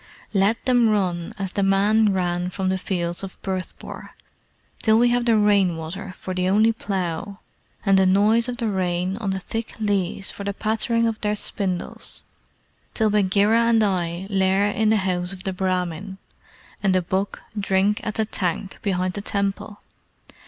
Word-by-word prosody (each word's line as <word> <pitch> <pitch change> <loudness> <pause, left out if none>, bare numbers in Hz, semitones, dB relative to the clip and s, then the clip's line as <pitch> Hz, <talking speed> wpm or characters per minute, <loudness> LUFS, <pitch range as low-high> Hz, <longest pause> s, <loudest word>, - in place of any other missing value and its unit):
"Let 200 +3 +2
them 245 -3 +4
run 180 -5 0
as 195 -2 -3
the 200 - -1
men 205 +2 +3
ran 180 -1 -1
from 190 0 -2
the 190 0 0
fields 175 -2 -2
of 195 -1 -8
Bhurtpore, 185 -1 -6 0.7
till 220 0 +4
we 240 +1 +4
have 240 0 +1
the 230 -2 +4
rain 200 -5 +3
water 180 +4 -6
for 185 - -5
the 185 0 0
only 215 +3 +4
plough, 195 -2 -3 0.5
and 195 -1 +5
the 190 - +4
noise 215 +5 +3
of 245 - -4
the 235 -2 -1
rain 185 -2 -1
on 215 -3 -3
the 190 0 -1
thick 225 +4 -5
leaves 195 -3 -1
for 200 - -8
the 200 0 -3
pattering 225 +2 +1
of 225 -1 -2
their 210 0 0
spindles 190 -3 -3 0.7
till 220 -2 +2
Bagheera 205 +2 +3
and 230 -1 +4
I 180 -2 -1
lair 195 +1 +2
in 215 +1 +1
the 220 - +4
house 185 -1 -1
of 185 -1 -10
the 190 - -2
Brahmin, 185 0 -2 0.6
and 195 -2 +2
the 185 - +2
buck 190 +3 -2 0.2
drink 200 0 +1
at 215 -1 -3
the 220 - +1
tank 190 -1 -3
behind 185 -2 0
the 205 - -4
temple! 200 +1 -3
195 Hz, 175 wpm, -23 LUFS, 185-215 Hz, 0.7 s, and